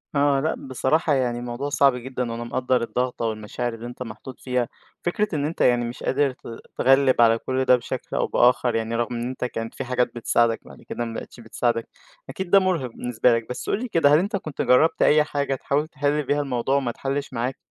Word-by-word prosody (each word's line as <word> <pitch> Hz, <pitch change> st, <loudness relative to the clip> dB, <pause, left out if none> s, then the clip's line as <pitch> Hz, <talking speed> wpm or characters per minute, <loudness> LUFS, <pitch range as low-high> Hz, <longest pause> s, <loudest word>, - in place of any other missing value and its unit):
آه 140 Hz, -1 st, +3 dB
لا 155 Hz, +4 st, 0 dB
بصراحة 145 Hz, +4 st, +1 dB
يعني 125 Hz, -3 st, 0 dB
الموضوع 120 Hz, +3 st, -4 dB
صعب 140 Hz, -2 st, +4 dB
جدًا 125 Hz, -1 st, -4 dB
وأنا 115 Hz, +1 st, -4 dB
مقدّر 125 Hz, +1 st, 0 dB
الضغطة 125 Hz, 0 st, -2 dB
والمشاعر 110 Hz, +2 st, -3 dB
اللي 115 Hz, +1 st, -8 dB
أنت 120 Hz, +1 st, -7 dB
محطوط 120 Hz, +3 st, -10 dB
فيها، 125 Hz, -2 st, -1 dB, 0.4 s
فكرة 205 Hz, +1 st, -1 dB
إن 145 Hz, -1 st, 0 dB
أنت 160 Hz, +3 st, -4 dB
يعني 120 Hz, -1 st, +3 dB
مش 120 Hz, +1 st, -7 dB
قادر 140 Hz, 0 st, +1 dB
ت 125 Hz, -, -17 dB, 0.4 s
تتغلب 135 Hz, -1 st, +4 dB
على 115 Hz, -1 st, +5 dB
كل 130 Hz, +2 st, -2 dB
ده 125 Hz, -, +6 dB
بشكل 120 Hz, -, -5 dB
أو -, -, +1 dB
بآخر 120 Hz, -1 st, +3 dB
يعني 115 Hz, +1 st, -1 dB
رغم 120 Hz, +1 st, -1 dB
إن 120 Hz, +1 st, -3 dB
أنت 130 Hz, -1 st, -4 dB
كانت 115 Hz, -2 st, -5 dB
في -, -, -4 dB
حاجات 125 Hz, -1 st, -1 dB
بتساعدك 115 Hz, -1 st, +2 dB
بعد -, -, -14 dB
كده 120 Hz, -, -4 dB
ما 115 Hz, -, -6 dB
بقيتش 115 Hz, -, -8 dB
بتساعدك، 115 Hz, 0 st, -1 dB, 0.4 s
أكيد 190 Hz, -1 st, -5 dB
ده 195 Hz, -, +7 dB
مُرهِق 180 Hz, -9 st, 0 dB
بالنسبة 125 Hz, +1 st, +1 dB
لك 115 Hz, 0 st, -4 dB
بس 125 Hz, -, -5 dB
قُل -, -, +1 dB
لي 255 Hz, -, -3 dB
كده 165 Hz, -9 st, +4 dB
هل 150 Hz, -, +6 dB
أنت 200 Hz, +4 st, -1 dB
كنت 155 Hz, -7 st, -4 dB
جربت 140 Hz, +6 st, +3 dB
أي 150 Hz, 0 st, +5 dB
حاجة 140 Hz, -2 st, -2 dB
تحاول 145 Hz, +3 st, -1 dB
تحل 145 Hz, 0 st, 0 dB
بيها 145 Hz, +2 st, 0 dB
الموضوع 130 Hz, -1 st, -1 dB
وما 135 Hz, -3 st, +1 dB
اتحلش 135 Hz, +3 st, -3 dB
معاك؟ 125 Hz, +2 st, -2 dB
125 Hz, 215 wpm, -24 LUFS, 120-145 Hz, 0.4 s, ده